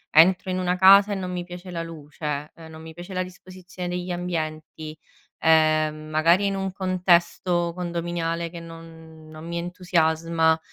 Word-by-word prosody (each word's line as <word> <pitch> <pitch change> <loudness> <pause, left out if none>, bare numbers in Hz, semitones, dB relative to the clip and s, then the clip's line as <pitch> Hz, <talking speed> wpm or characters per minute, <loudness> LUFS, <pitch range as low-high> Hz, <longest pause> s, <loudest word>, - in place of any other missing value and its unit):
Entro 180 +3 +6
in 185 - -1
una 180 0 0
casa, 200 +2 +7
e - - -1
non 185 -1 -4
mi 180 -1 -3
piace 180 +1 -9
la 170 -1 -3
luce, 150 -2 -6
non 160 -1 -11
mi 160 0 -10
piace 175 +3 -9
la 185 - 0
disposizione 185 0 -9
degli 180 0 -3
ambienti, 155 -3 -4 0.4
ehm, 155 -1 +3
magari 165 +5 +3
in 195 - 0
un 195 -1 -2
contesto 175 -2 +1
condominiale 170 -1 -3
che 170 - -8
non 165 -1 -12
non 155 +1 -10
mi 170 0 -4
entusiasma. 165 -2 +1
170 Hz, 155 wpm, -24 LUFS, 160-180 Hz, 0.4 s, casa